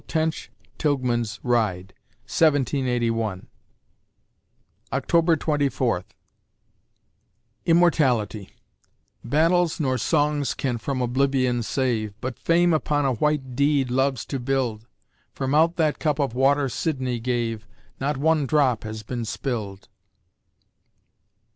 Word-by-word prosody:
Tench 160 0 -2 0.3
Tilghman's 120 -6 0
ride, 100 -7 0 0.3
1781_ 125 - 0 1.5
October 170 0 +2
Twenty 145 -2 0
Fourth - - -2 1.5
IMMORTALITY 130 - +2 0.7
Battles 165 +6 +2
nor 130 -4 0
songs 145 0 +1
can 125 -4 -2
from 130 +2 -2
Oblivion 130 -1 +1
save, 110 -4 -2
But 130 +1 -5
Fame 170 +1 +3
upon 145 -2 +1
a 135 - +2
white 135 0 -1
deed 140 -2 +2
loves 130 -1 0
to 135 - -4
build; 120 -4 -2 0.5
From 135 0 -2
out 165 +3 +4
that 155 -3 +1
cup 150 -3 0
of 140 -6 -1
water 135 +2 +3
Sidney 130 -2 -2
gave, 115 -2 -2 0.3
Not 140 +1 -1
one 155 0 +2
drop 135 -6 +2
has 110 0 -6
been 120 +2 -4
spilled. 110 -4 -4
130 Hz, 105 wpm, -24 LUFS, 120-150 Hz, 1.5 s, out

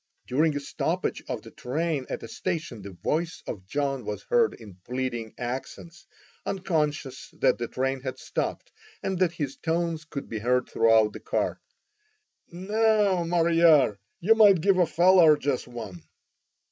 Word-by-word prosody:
During 150 +4 +1
a - - -1
stoppage 140 - -2
of - - -4
the - - -12
train 150 +1 -2
at - - -5
a - - -6
station, 160 - -4
the 100 - -8
voice 155 - -3
of 95 -2 -7
John 135 +1 -1
was 105 0 -5
heard 475 -2 +2
in 100 -5 -13
pleading 120 -2 -4
accents, 140 +6 -6 0.4
unconscious 155 -8 -2
that 130 -2 +2
the 120 - -2
train 135 +1 -2
had 130 -1 -5
stopped, - - -4 0.3
and 190 -2 -2
that 180 -3 +2
his 145 -5 -4
tones 165 -1 -2
could 140 -2 -6
be 110 - -4
heard 125 +3 +1
throughout 110 -2 +3
the - - -8
car: - - -2 0.9
"Now, 205 0 +2
Mariar, 165 - +4 0.2
you 210 +6 +5
might 205 -6 +6
give 190 +1 +3
a 175 - +4
feller 170 -1 +6
jes 140 -3 -1
one." 110 -8 -8
150 Hz, 155 wpm, -26 LUFS, 125-175 Hz, 0.9 s, might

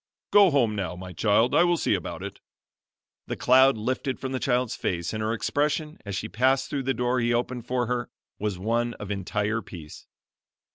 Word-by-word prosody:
Go 205 -2 +7
home 120 -8 +2
now, 90 -4 -3
my 90 0 -8
child. 110 +6 +2
I 170 - +6
will 175 -1 +3
see - - +1
about - - -3
it." - - -7 0.9
The - - -3
cloud 130 0 +5
lifted 130 +4 -2
from 130 - -4
the 130 - -2
child's 125 -2 0
face, 85 0 -2
and 110 - -3
her 110 +1 0
expression, 150 +6 -1
as 100 - -3
she - - -3
passed 130 +6 +1
through 140 - -1
the 135 - +2
door 125 +1 +1
he 120 0 +1
opened 120 0 -3
for 125 -1 0
her, 120 0 -2 0.3
was 105 -3 -2
one 115 +4 -1
of 105 -1 -7
entire 105 +3 -1
peace. 80 -7 -11
120 Hz, 195 wpm, -26 LUFS, 105-130 Hz, 0.9 s, Go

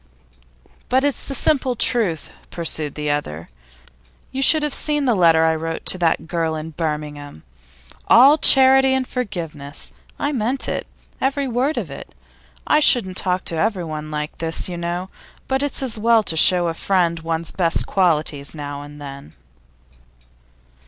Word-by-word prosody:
'But 260 +2 +2
it's 285 -1 -1
the 275 - -3
simple 265 -5 +1
truth,' 215 -9 0 0.2
pursued 160 -3 -1
the 150 -1 -2
other. 85 - -4 0.8
'You 265 - -3
should 310 +3 +5
have 300 -2 -1
seen 295 -2 -1
the 245 - +3
letter 165 -4 +4
I 160 0 +3
wrote 165 0 -5
to 185 - -1
that 165 -2 +1
girl 165 -1 -2
at 155 0 -8
Birmingham 150 - -5 0.6
all 275 +6 +7
charity 265 0 +6
and 260 -1 -1
forgiveness. 165 - -6 0.3
I 285 - -1
meant 255 0 -1
it, - - -3 0.3
every 275 +1 0
word 255 +5 -1
of - - -4
it. - - -10 0.5
I 300 - +3
shouldn't 220 -10 +3
talk 185 0 0
to 165 - -2
everyone 160 -5 -2
like 150 0 -5
this, 165 0 -2
you 180 - -5
know; 175 +2 -4 0.4
but 265 0 0
it's 285 -1 -2
as 235 -4 -3
well 230 0 +3
to 165 - -1
show 175 +2 +4
a 165 - -1
friend 170 -1 0
one's 165 0 -3
best 170 -3 0
qualities 155 -6 0
now 145 -1 -6
and 145 0 -11
then. 140 - -10
175 Hz, 160 wpm, -20 LUFS, 155-255 Hz, 0.8 s, all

